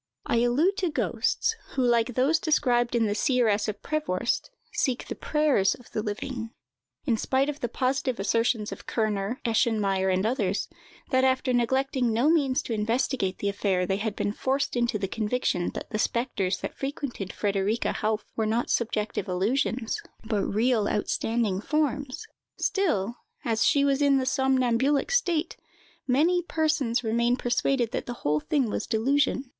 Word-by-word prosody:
I -, -, +1 dB
allude 275 Hz, -, +2 dB
to 365 Hz, -, 0 dB
ghosts, 310 Hz, -, 0 dB, 0.2 s
who, 265 Hz, -, +2 dB
like 240 Hz, 0 st, +2 dB
those 280 Hz, +6 st, +3 dB
described 245 Hz, -6 st, +2 dB
in 230 Hz, -1 st, +3 dB
the 205 Hz, -, 0 dB
"Seeress 220 Hz, -3 st, +2 dB
of 210 Hz, -1 st, -5 dB
Prevorst," 240 Hz, -8 st, -1 dB, 0.2 s
seek 260 Hz, -, -1 dB
the -, -, -3 dB
prayers 295 Hz, -11 st, +2 dB
of 245 Hz, -, -18 dB
the 215 Hz, -, -2 dB
living. 225 Hz, +3 st, -4 dB, 0.6 s
In 240 Hz, -6 st, +2 dB
spite 265 Hz, +5 st, +1 dB
of 295 Hz, 0 st, -4 dB
the 240 Hz, -, -2 dB
positive 255 Hz, -2 st, -1 dB
assertions 230 Hz, +1 st, +1 dB
of -, -, -9 dB
Kerner, 215 Hz, +1 st, -1 dB
Eschenmayer, 210 Hz, -5 st, +1 dB
and 185 Hz, +2 st, +1 dB
others, 210 Hz, -5 st, 0 dB, 0.4 s
that 260 Hz, -1 st, +3 dB
after 260 Hz, 0 st, +2 dB
neglecting 255 Hz, 0 st, +1 dB
no 240 Hz, +8 st, +3 dB
means 275 Hz, -6 st, +2 dB
to 235 Hz, -, -3 dB
investigate 225 Hz, -2 st, 0 dB
the 200 Hz, -, -1 dB
affair, 195 Hz, -2 st, 0 dB
they 190 Hz, +2 st, 0 dB
had 215 Hz, 0 st, -3 dB
been 205 Hz, -, -1 dB
forced 270 Hz, +6 st, -1 dB
into 240 Hz, -2 st, +1 dB
the 195 Hz, -1 st, -2 dB
conviction 210 Hz, -4 st, -1 dB
that -, -, -6 dB
the 215 Hz, -, -2 dB
spectres 215 Hz, -6 st, 0 dB
that -, -, -5 dB
frequented 270 Hz, -8 st, -4 dB
Frederica 205 Hz, +2 st, 0 dB
Hauffe 215 Hz, -1 st, -1 dB
were 220 Hz, -1 st, 0 dB
not 230 Hz, +2 st, 0 dB
subjective 215 Hz, -2 st, -1 dB
illusions, 225 Hz, +5 st, 0 dB, 0.2 s
but 220 Hz, -2 st, -1 dB
real 220 Hz, 0 st, +1 dB
outstanding 210 Hz, -1 st, 0 dB
forms, 290 Hz, -, -1 dB, 0.3 s
still, 240 Hz, -, 0 dB, 0.3 s
as 225 Hz, -2 st, +1 dB
she 280 Hz, -2 st, +4 dB
was 275 Hz, 0 st, +2 dB
in 280 Hz, -1 st, +4 dB
the 260 Hz, -, 0 dB
somnambulic 265 Hz, -, +2 dB
state, 350 Hz, -9 st, +1 dB, 0.5 s
many 320 Hz, +8 st, +3 dB
persons 305 Hz, -8 st, 0 dB
remain 235 Hz, +2 st, +1 dB
persuaded 245 Hz, -1 st, 0 dB
that -, -, -3 dB
the 245 Hz, -, -3 dB
whole 150 Hz, +1 st, +2 dB
thing 275 Hz, -, 0 dB
was 210 Hz, -, -3 dB
delusion. 265 Hz, +4 st, +1 dB
240 Hz, 160 wpm, -27 LUFS, 215-270 Hz, 0.6 s, she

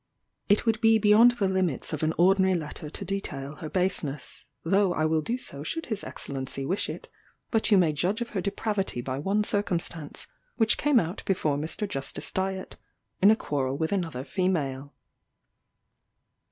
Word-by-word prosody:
"It 205 Hz, +3 st, +3 dB
would 225 Hz, -1 st, +1 dB
be 225 Hz, -1 st, +6 dB
beyond 220 Hz, +3 st, +6 dB
the 210 Hz, -5 st, 0 dB
limits 185 Hz, -7 st, -1 dB
of 155 Hz, -, -3 dB
an 155 Hz, 0 st, +2 dB
ordinary 190 Hz, +1 st, +4 dB
letter 150 Hz, -2 st, -5 dB
to 195 Hz, -, -6 dB
detail 150 Hz, -7 st, -4 dB
her 160 Hz, -3 st, -6 dB
baseness, 170 Hz, -7 st, -2 dB, 0.2 s
though 190 Hz, +1 st, +2 dB
I 155 Hz, -, +1 dB
will 155 Hz, 0 st, +2 dB
do 235 Hz, +11 st, -2 dB
so 140 Hz, -, -7 dB
should 325 Hz, -, -3 dB
his 215 Hz, -3 st, -4 dB
Excellency 135 Hz, 0 st, -5 dB
wish 185 Hz, +8 st, -1 dB
it; -, -, -7 dB, 0.4 s
but 225 Hz, -2 st, +2 dB
you 205 Hz, -, +6 dB
may 170 Hz, -4 st, +4 dB
judge 180 Hz, +8 st, 0 dB
of 240 Hz, 0 st, -3 dB
her 195 Hz, -, -2 dB
depravity 200 Hz, -, -2 dB
by 130 Hz, +2 st, -3 dB
one 200 Hz, +7 st, +1 dB
circumstance, 175 Hz, -7 st, -1 dB, 0.3 s
which 225 Hz, -2 st, +3 dB
came 290 Hz, -4 st, +4 dB
out 170 Hz, +2 st, -3 dB
before 160 Hz, -7 st, +1 dB
Mr. 160 Hz, +8 st, -3 dB
Justice 135 Hz, -7 st, -3 dB
Dyett, 190 Hz, 0 st, -3 dB, 0.4 s
in 195 Hz, -, +8 dB
a 220 Hz, -, +7 dB
quarrel 135 Hz, -8 st, -2 dB
with 160 Hz, +1 st, -1 dB
another 165 Hz, -10 st, -2 dB
female. 145 Hz, -7 st, -1 dB
185 Hz, 170 wpm, -27 LUFS, 150-205 Hz, 0.4 s, in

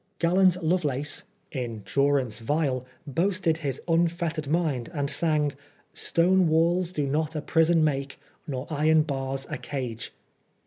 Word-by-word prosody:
GMlant 180 Hz, +1 st, +4 dB
Lovelace, 145 Hz, -4 st, 0 dB, 0.3 s
in 120 Hz, -6 st, -4 dB
durance 140 Hz, -5 st, +1 dB
vile, 130 Hz, 0 st, -1 dB, 0.2 s
boasted 170 Hz, +2 st, 0 dB
his 140 Hz, -5 st, -2 dB
un 170 Hz, 0 st, +4 dB
fettered 165 Hz, -3 st, -3 dB
mind, 150 Hz, -6 st, 0 dB
and 140 Hz, -1 st, -1 dB
sang 155 Hz, -2 st, +1 dB, 0.2 s
— -, -, -31 dB
'* -, -, -42 dB, 0.2 s
Stone 180 Hz, +1 st, +4 dB
walk 170 Hz, +3 st, +2 dB
do 155 Hz, -5 st, -2 dB
not 155 Hz, +3 st, -1 dB
a 155 Hz, -, -1 dB
prison 165 Hz, 0 st, +3 dB
make, 140 Hz, -2 st, -1 dB, 0.3 s
Nor 130 Hz, -2 st, -3 dB
iron 155 Hz, +1 st, +4 dB
bars 135 Hz, -2 st, -3 dB
a -, -, -3 dB
cage." 125 Hz, -5 st, -5 dB
150 Hz, 145 wpm, -26 LUFS, 135-165 Hz, 0.3 s, GMlant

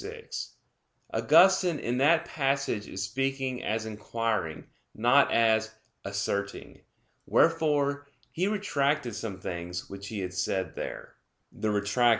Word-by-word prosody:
6: 455 Hz, +2 st, -7 dB, 0.6 s
Augustine 185 Hz, -3 st, +5 dB
in 125 Hz, -2 st, -2 dB
that 155 Hz, +4 st, +4 dB
passage 135 Hz, -7 st, -1 dB
is 95 Hz, -, -4 dB
speaking 130 Hz, +3 st, -2 dB
as 110 Hz, +1 st, -1 dB
inquiring, 110 Hz, -5 st, -2 dB, 0.3 s
not 125 Hz, +6 st, +4 dB
as 110 Hz, -1 st, +3 dB, 0.3 s
asserting. 100 Hz, 0 st, -3 dB, 0.5 s
Wherefore 145 Hz, -3 st, +2 dB, 0.2 s
he 180 Hz, +4 st, 0 dB
retracted 145 Hz, -, 0 dB
some 100 Hz, -2 st, -5 dB
things 85 Hz, 0 st, -5 dB
which 100 Hz, 0 st, -7 dB
he 105 Hz, -2 st, -4 dB
had 90 Hz, -1 st, -4 dB
said 95 Hz, -2 st, -1 dB
there -, -, -7 dB, 0.4 s
(Retrac. 105 Hz, +3 st, +2 dB
115 Hz, 115 wpm, -28 LUFS, 100-140 Hz, 0.6 s, Augustine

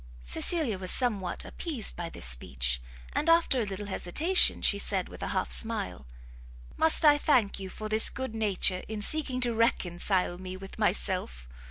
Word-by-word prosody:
Cecilia 220 Hz, -, -1 dB
was 185 Hz, -1 st, 0 dB
somewhat 210 Hz, -7 st, +1 dB
appeased 290 Hz, -, -4 dB
by 170 Hz, -1 st, -6 dB
this 60 Hz, -, -2 dB
speech; -, -, 0 dB, 0.3 s
and, 315 Hz, -, 0 dB
after 330 Hz, -6 st, +3 dB
a 230 Hz, -, -1 dB
little 200 Hz, +1 st, -6 dB
hesitation, 300 Hz, -, +1 dB
she -, -, +2 dB
said, -, -, -1 dB
with -, -, -13 dB
a -, -, -3 dB
half -, -, -3 dB
smile, 90 Hz, -, -2 dB, 0.7 s
"Must 320 Hz, 0 st, +4 dB
I 290 Hz, -1 st, +6 dB
thank 240 Hz, -11 st, +1 dB
you 190 Hz, -1 st, -7 dB
for 215 Hz, +3 st, -7 dB
this 215 Hz, +1 st, +7 dB
good 260 Hz, -3 st, -6 dB
nature 195 Hz, -4 st, +1 dB
in 215 Hz, -1 st, -5 dB
seeking 280 Hz, -1 st, +3 dB
to 240 Hz, -1 st, +1 dB
reconcile 185 Hz, -5 st, -1 dB
me 185 Hz, 0 st, -7 dB
with 195 Hz, +3 st, -12 dB
myself? 185 Hz, -, -2 dB
210 Hz, 170 wpm, -28 LUFS, 180-255 Hz, 0.7 s, this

